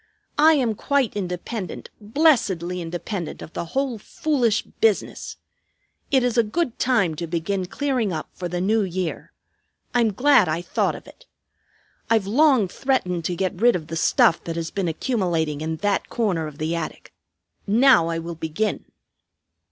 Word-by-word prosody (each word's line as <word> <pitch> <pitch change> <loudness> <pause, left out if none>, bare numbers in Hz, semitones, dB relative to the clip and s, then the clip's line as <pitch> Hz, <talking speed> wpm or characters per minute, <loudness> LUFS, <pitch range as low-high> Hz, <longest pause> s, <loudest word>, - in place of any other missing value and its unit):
I 315 +2 +7
am 245 -6 +1
quite 270 +2 0
independent; 185 +1 -5
blessedly 205 - +2
independent 175 +1 -5
of 160 - -11
the - - -3
whole 260 +4 -2
foolish 245 -5 0
business. 220 -3 -1 0.7
It 265 -3 +3
is 245 -1 +1
a - - +5
good 245 +3 -2
time 230 -10 +2
to 170 +1 -4
begin 180 +3 -2
clearing 255 -3 -1
up 155 -2 -4
for 180 - -5
the 175 +1 -2
new 215 +4 +2
year. 185 -3 -3 0.6
I'm 235 -3 +3
glad 245 - +4
I 165 +3 -1
thought - - 0
of - - -11
it. - - -17 0.8
I've 225 -3 +3
long 255 -1 +4
threatened 180 -7 -1
to 180 - -1
get 185 +1 -2
rid 240 +1 +5
of 160 -4 -5
the 165 - -4
stuff 165 +1 +3
that 165 - -4
has 165 -1 -4
been 195 -3 -2
accumulating 165 - -1
in 160 +1 -2
that 205 -1 0
corner 185 -9 -1
of 150 -1 -10
the 160 +3 -2
attic. 165 -2 -6 0.5
Now 235 -4 +5
I 165 0 -2
will 165 +1 -5
begin." 165 +6 -2
195 Hz, 160 wpm, -23 LUFS, 170-245 Hz, 0.8 s, I